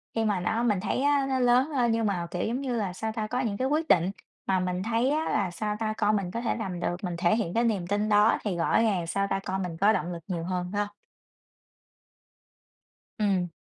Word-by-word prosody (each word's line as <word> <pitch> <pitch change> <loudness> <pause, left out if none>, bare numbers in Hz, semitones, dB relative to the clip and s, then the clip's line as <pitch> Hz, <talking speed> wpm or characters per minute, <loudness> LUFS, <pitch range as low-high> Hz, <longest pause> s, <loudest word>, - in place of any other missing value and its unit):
khi 225 - +1
mà 205 -3 +1
nó 220 +6 0
mình 210 -5 +2
thấy 210 +6 -1
á 285 -1 +3
nó 260 -1 +1
lớn 250 +3 +4
hơn 240 -3 +2
nhưng 225 0 +1
mà 180 -4 -1
kiểu 175 - -2
giống 245 +4 -2
như 260 -3 -2
là, 200 -5 -2
sao 220 +4 -3
ta? 220 -1 -3
Có 245 +3 -2
những 220 -6 -1
cái 260 - 0
quyết 310 +3 0
định 175 +2 +4 0.4
mà 190 -1 +2
mình 180 0 -2
thấy 230 +4 +1
á 310 +2 0
là 190 -3 0
sao 210 +4 -2
ta? 215 -1 -1
Con 210 0 +2
mình 185 -3 -2
có 230 - -3
thể 235 - 0
làm 190 -6 -4
được, 175 - -1
mình 175 -2 -2
thể 175 +4 +3
hiện 205 -6 -2
cái 230 - +2
niềm 200 -7 0
tin 205 +2 0
đó 210 +2 +5
thì 195 -5 -2
rõ 170 +6 +2
ràng 190 -7 +1
sao 195 +3 0
ta? 195 - 0
Con 190 +1 -2
mình 170 -2 -5
có 205 +5 +4
động 180 -3 -2
lực 170 -1 -8
nhiều 175 -4 -3
hơn, 180 0 -2
phải 205 - 0
hông? 205 0 -4 2.3
Ừm. 195 -4 +1
205 Hz, 250 wpm, -27 LUFS, 180-230 Hz, 2.3 s, đó